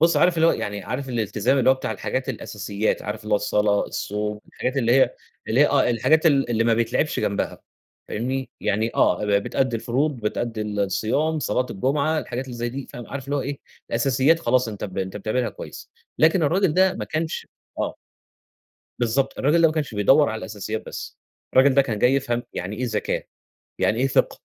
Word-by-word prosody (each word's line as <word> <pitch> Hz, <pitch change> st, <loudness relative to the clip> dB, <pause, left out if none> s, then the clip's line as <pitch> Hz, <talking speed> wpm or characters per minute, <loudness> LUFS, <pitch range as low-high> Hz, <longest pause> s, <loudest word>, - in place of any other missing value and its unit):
بُصّ، 170 Hz, +1 st, +4 dB
عارف 175 Hz, -1 st, +4 dB
اللي 165 Hz, 0 st, +4 dB
هو -, -, +5 dB
يعني 100 Hz, -1 st, -4 dB
عارف 130 Hz, +6 st, -4 dB
الالتزام 115 Hz, +2 st, 0 dB
اللي 130 Hz, 0 st, +5 dB
هو -, -, +5 dB
بتاع 130 Hz, -, -4 dB
الحاجات 130 Hz, +1 st, -3 dB
الأساسيات، 105 Hz, -3 st, -2 dB
عارف 105 Hz, +1 st, -5 dB
اللي 105 Hz, 0 st, -4 dB
هو -, -, +6 dB
الصلاة، 105 Hz, 0 st, +1 dB
الصوم 105 Hz, +1 st, -3 dB
الحاجات 130 Hz, +2 st, -3 dB
اللي 120 Hz, -2 st, +2 dB
هي 135 Hz, -, +4 dB, 0.3 s
اللي -, -, +3 dB
هي -, -, +7 dB
آه، -, -, +3 dB
الحاجات 155 Hz, +8 st, +3 dB
ال 135 Hz, -5 st, +3 dB
اللي 115 Hz, -1 st, +2 dB
ما 115 Hz, -1 st, +4 dB
بيتلعبش 115 Hz, +7 st, 0 dB
جنبها، 100 Hz, -, -2 dB, 0.5 s
فاهمني، 130 Hz, +3 st, -3 dB
يعني 110 Hz, +3 st, 0 dB
آه -, -, +3 dB
ب 105 Hz, -, -1 dB
بتأدي 130 Hz, -3 st, 0 dB
الفروض، 135 Hz, +6 st, 0 dB
بتأدي 110 Hz, +1 st, -2 dB
الصيام، 110 Hz, +9 st, 0 dB
صلاة 130 Hz, -3 st, 0 dB
الجمعة، 140 Hz, +9 st, 0 dB
الحاجات 125 Hz, -1 st, -4 dB
اللي 125 Hz, -2 st, -8 dB
زي 120 Hz, 0 st, -2 dB
دي 135 Hz, +2 st, -6 dB
فاهم، 120 Hz, -, -9 dB
عارف 140 Hz, -1 st, -6 dB
اللي 140 Hz, +2 st, -2 dB
هو 140 Hz, -, 0 dB
إيه، 140 Hz, +1 st, -4 dB, 0.3 s
الأساسيات 135 Hz, +7 st, +3 dB
خلاص 125 Hz, -6 st, +2 dB
أنت 105 Hz, -2 st, -5 dB
ب 95 Hz, -2 st, -6 dB
أنت 95 Hz, +1 st, -3 dB
بتعملها 110 Hz, +4 st, -1 dB
كويس -, -, -10 dB, 0.3 s
لكن 160 Hz, +3 st, +4 dB
الراجل 170 Hz, +2 st, +2 dB
ده 185 Hz, 0 st, +4 dB
ما -, -, -4 dB
كانش 160 Hz, +1 st, -3 dB, 0.3 s
آه. -, -, -2 dB, 1.0 s
بالضبط، 120 Hz, +3 st, 0 dB
الراجل 150 Hz, +5 st, +3 dB
ده 165 Hz, -, +7 dB
ما 155 Hz, -, -4 dB
كانش 145 Hz, -8 st, -2 dB
بيدوّر 135 Hz, +9 st, +5 dB
على 110 Hz, 0 st, -3 dB
الأساسيات 110 Hz, +1 st, -5 dB
بس، -, -, -7 dB, 0.3 s
الراجل 130 Hz, +1 st, +5 dB
ده 140 Hz, -, +6 dB
كان 115 Hz, -6 st, -3 dB
جاي 125 Hz, +4 st, +4 dB
يفهم 120 Hz, -3 st, 0 dB
يعني 100 Hz, +4 st, -4 dB
إيه 125 Hz, -, -2 dB
زكاة، 110 Hz, -4 st, -1 dB, 0.6 s
يعني 110 Hz, -, +1 dB
إيه 135 Hz, -, +3 dB
فِقْه، 135 Hz, -, +1 dB
125 Hz, 200 wpm, -23 LUFS, 110-140 Hz, 1.0 s, هي